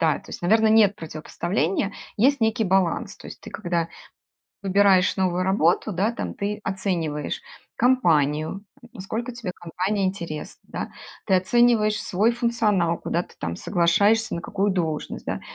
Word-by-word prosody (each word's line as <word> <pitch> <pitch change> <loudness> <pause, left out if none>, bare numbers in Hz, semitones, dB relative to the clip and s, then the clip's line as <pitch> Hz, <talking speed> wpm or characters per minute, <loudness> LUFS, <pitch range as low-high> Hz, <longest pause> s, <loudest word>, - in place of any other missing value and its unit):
да, 160 -2 +3
то - - -15
есть, - - -8
наверно, 220 +5 +4
нет 215 -2 +5
противопоставления, 175 +5 -2 0.2
есть 265 +4 +3
некий 225 0 +1
баланс. 190 -2 +1
То - - -11
есть - - -11
ты - - -10
когда 175 -4 -2 0.7
выбираешь 195 -1 +4
новую 185 -1 +1
работу, 190 +2 +2
да, 200 +6 0
там, - - -5
ты 205 +1 -3
оцениваешь 170 -6 -2 0.4
компанию, 165 - +2 0.3
насколько 225 +6 -5
тебе 230 -6 -5
компания 185 +4 -2
интересна, 170 -5 -4
да, - - -4 0.4
ты 190 - +3
оцениваешь 215 +2 +3
свой 210 +5 +2
функционал, 215 -8 +1
куда 170 - -1
ты - - -17
там 85 +1 -4
соглашаешься, 205 +5 +2
на 170 - -4
какую 200 0 0
должность, 160 -5 -3
да, - - -3
195 Hz, 145 wpm, -24 LUFS, 170-215 Hz, 0.7 s, нет